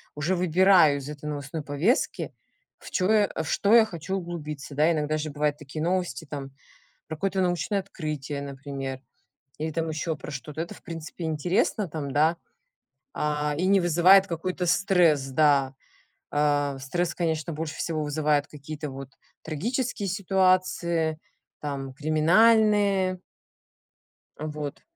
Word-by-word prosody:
уже 150 +6 0
выбираю 180 -3 +5
из 135 - -8
этой 150 0 -8
новостной 145 +1 -5
повестки, 150 - 0 0.5
в - - -12
чё 185 0 +1
я 215 -2 +5
а, - - -7
во - - 0
что 205 +2 +2
я 230 -1 +8
хочу 175 -2 -5
углубиться. 150 -5 -6
Да, 155 +4 +4
иногда 155 -1 0
же 155 0 -3
бывают 145 0 0
такие 150 +1 -7
новости 175 -5 -1
там 140 -2 -7 0.6
про 160 - -5
какое-то 190 +3 0
научное 180 +2 0
открытие, 155 -7 -5
например, 135 -1 -6 0.6
или 155 +1 -2
там 165 +1 -2
еще 160 +1 -2
про 150 - -9
что-то. 150 +2 -6
Это, 170 - -4
в - - -16
принципе, 165 +1 -7
интересно 180 - 0
там, 145 -3 -5
да, 155 +3 +3 0.8
а, 150 0 -1
и 180 - +1
не 195 0 +5
вызывает 180 +3 +6
какой-то 180 +1 -3
стресс, 175 -6 +3
да. 140 -1 +3 0.6
Ам, 145 -1 +1
стресс, 175 +6 -2
конечно, 165 -1 -1
больше 155 0 -4
всего 155 -2 -2
вызывает 150 -1 +1
какие-то 150 0 -7
вот 135 0 -8 0.3
трагические 215 - -2
ситуации, 185 -4 +1 0.4
там, 135 -2 -5
криминальные. 190 +5 +3 1.2
Вот. 150 -1 -5
155 Hz, 140 wpm, -26 LUFS, 145-185 Hz, 1.2 s, я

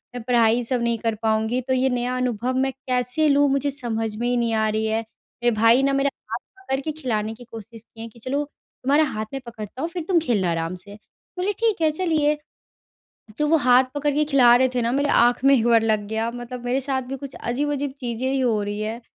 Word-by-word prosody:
मैं 245 - -4
पढ़ाई 235 -1 +3
सब 245 +1 -1
नहीं 235 0 +1
कर 225 -1 -1
पाऊँगी 220 +2 +1
तो 260 - +1
ये 260 +1 +2
नया 250 0 -1
अनुभव 250 0 -1
मैं 270 - -1
कैसे 255 +3 0
लूँ 285 0 +4
मुझे 275 +1 0
समझ 225 -5 -3
में 240 - -1
ही 245 - +1
नहीं 235 -1 0
आ 220 0 +2
रही 215 +1 -1
है। 220 0 0
मेरे 240 +2 -4
भाई 230 +4 +5
ने 275 - +2
मेरा 280 0 +2 0.2
हाथ - - -1 0.2
पकड़ 270 -7 -1
के 310 - -3
खिलाने 220 -4 -1
की 245 - -13
कोशिश 225 0 -10
किए 225 0 -10
कि 235 - -19
चलो 275 +5 -2
तुम्हारे 285 +1 -1
हाथ 215 0 -3
में 270 - -4
पकड़ता 230 +2 -8
हूँ 330 - -2
फिर 340 -1 -5
तुम 360 -3 +4
खेलना 195 - +1
आराम 165 +1 -2
से 205 0 -11 0.4
बोली 400 +3 0
ठीक 445 -7 +1
है 315 - +3
चलिए। 305 -3 +1 1.0
तो 300 - +2
वो 325 +2 +4
हाथ 250 +1 +7
पकड़ 290 0 0
के 300 +1 +2
खिला 260 -5 +6
रहे 260 +1 +3
थे 245 - +1
ना 230 - 0
मेरी 285 +2 +1 0.2
आँख 245 +1 +1
में 275 - +7
एक 230 - 0
बार 230 -1 +5
लग 215 -2 0
गया 220 +2 -2
मतलब 245 0 -7
मेरे 255 +3 0
साथ 265 -1 +1
भी - - -2
कुछ 270 - -10
अजीब-अजीब 285 +3 -2
चीज़ें 245 +1 -3
ही 270 - 0
हो 235 -5 +1
रही 205 +1 -4
है 225 +3 -4
245 Hz, 235 wpm, -23 LUFS, 225-275 Hz, 1.0 s, हाथ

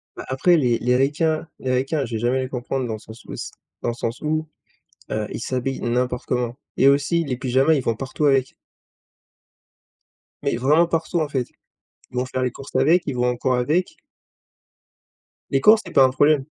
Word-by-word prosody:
Bah, - - -8
après 150 +7 +3
les 125 -6 +2
les 125 +2 +1
ricains 155 +5 +1
les 130 - -2
ricains 135 +3 0
je 120 - -8
vais - - -1
jamais 120 +3 +1
les 130 - -3
comprendre 130 +1 -3
dans 115 - -3
le 110 - -6
sens 110 +1 -13
où - - -7
c - - -6 0.3
dans - - -1
le - - -1
sens 115 0 -4
où, 155 +1 -1 0.6
heu, 110 -1 -1
ils - - -5
s'habillent 130 +2 -2
n'importe 125 +1 -1
comment 125 -1 -1 0.2
et 135 - +5
aussi, 145 +4 +2
les 130 -4 -3
pyjamas 130 +4 +2
ils 140 - 0
vont 115 - 0
partout 135 +4 -2
avec 135 -2 +2 1.9
mais, - - 0
vraiment 150 +7 +4
partout 165 0 -1
en 155 - -1
fait. 130 -4 -1 0.6
Ils - - -14
vont 125 - +1
faire 130 0 -3
les 125 -1 0
courses 135 +3 -12
avec, 170 +3 +4
ils 140 - -3
vont 125 0 +1
en 125 - -1
cours 130 +1 0
avec 150 +9 0 1.5
les 135 - +1
cours 215 +8 +7
c'est - - -10
pas 135 - +7
un 130 - +5
problème. 145 +1 +3
130 Hz, 205 wpm, -22 LUFS, 125-150 Hz, 1.9 s, cours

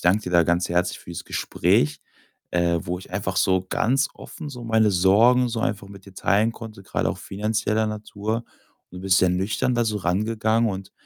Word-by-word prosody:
danke 100 +5 +2
dir 90 - -4
da 85 -1 +5
ganz 85 +2 +1
herzlich 90 +1 0
fürs 85 0 -8
Gespräch, 75 0 +1 0.5
äh, 85 -1 +1
wo 90 +1 -3
ich 95 - -13
einfach 95 -1 -3
so 95 -1 +2
ganz 135 +8 +1
offen 155 - -9
so 125 -4 -8
meine 110 -2 +3
Sorgen 110 +7 +4
so 115 -1 -3
einfach 100 -3 -2
mit 100 -1 -13
dir 95 - -14
teilen 105 +5 +2
konnte, 110 -4 -10
grade - - -1
auch - - -6
finanzieller 105 +1 -1
Natur. 105 0 -3 0.5
Und 90 - -9
du - - -8
bist 95 0 +3
ja 90 - +4
nüchtern 95 +7 0
da 120 0 +1
so 110 -2 -1
rangegangen 110 +5 +1
und 95 -1 -7
100 Hz, 195 wpm, -24 LUFS, 90-110 Hz, 0.5 s, da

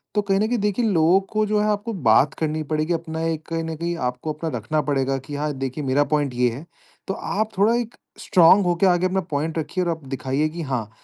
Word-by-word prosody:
तो 210 - +3
कहीं 195 -1 +1
न 215 - +2
कहीं 245 +2 0
देखिए 210 +3 0
लोगों 175 -2 +4
को 215 -1 +1
जो 210 0 +1
है - - +1
आपको 210 +2 -1
बात 135 - +3
करनी 155 0 -1
पड़ेगी 155 +2 -1
अपना 160 -1 -4
एक 160 -1 -2
कहीं 165 0 -2
न 160 0 -4
कहीं 170 +2 -2
आपको 150 +5 -6
रखना 150 +1 -1
पड़ेगा 135 -2 0
कि 145 +2 -8
हाँ, 150 +1 -1
देखिए 135 +2 -4
मेरा 135 +2 +2
पॉइंट 145 -3 +1
ये 125 0 +3
है, 135 +8 -8 0.4
तो 195 - -1
आप 215 +2 -2
थोड़ा 210 +4 +4
एक 235 -1 -3 0.2
स्ट्रांग 185 +2 +5
होके 175 +2 +2
आगे 180 0 +3
अपना 190 +1 +1
पॉइंट 155 +3 -2
रखिए 165 +4 -2
और 175 - -1
आप 160 -3 -6
दिखाइए 135 +3 -1
कि 170 +2 -6
हाँ, 125 -7 -3
160 Hz, 235 wpm, -23 LUFS, 145-190 Hz, 0.4 s, स्ट्रांग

